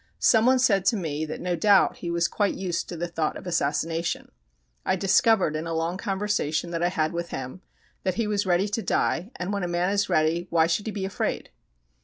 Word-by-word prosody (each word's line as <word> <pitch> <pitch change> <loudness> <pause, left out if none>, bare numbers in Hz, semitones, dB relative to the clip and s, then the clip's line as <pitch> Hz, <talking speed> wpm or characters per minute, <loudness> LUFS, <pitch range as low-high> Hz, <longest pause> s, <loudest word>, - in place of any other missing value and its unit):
Someone 245 +3 +4
said 215 -7 +3
to 225 - +3
me 160 -4 -3
that 155 - -6
no 180 -1 -1
doubt 200 +3 +4
he 175 - -5
was 170 0 +1
quite 205 +2 0
used 180 -3 -3
to 175 - -6
the 175 +2 -2
thought 165 -2 -2
of - - -11
assassination. 165 0 -1 0.5
I - - +1
discovered, 195 -2 +3
in 155 +2 -3
a 165 - -2
long 165 +3 -2
conversation 195 -6 -1
that 165 -1 -2
I 175 - +2
had 160 -3 -1
with 170 0 -3
him, 130 +7 -6 0.4
that 185 -2 -1
he 230 - 0
was 205 -2 -1
ready 180 +3 +2
to 210 +2 -2
die, 185 -2 0
and 180 +3 -3
when 200 - -1
a 175 - -1
man 175 +2 0
is 205 0 0
ready 160 +3 +1
why 165 -1 +4
should 170 +6 -1
he - - -1
be 200 -2 -3
afraid? 190 - -3
175 Hz, 220 wpm, -25 LUFS, 165-200 Hz, 0.5 s, Someone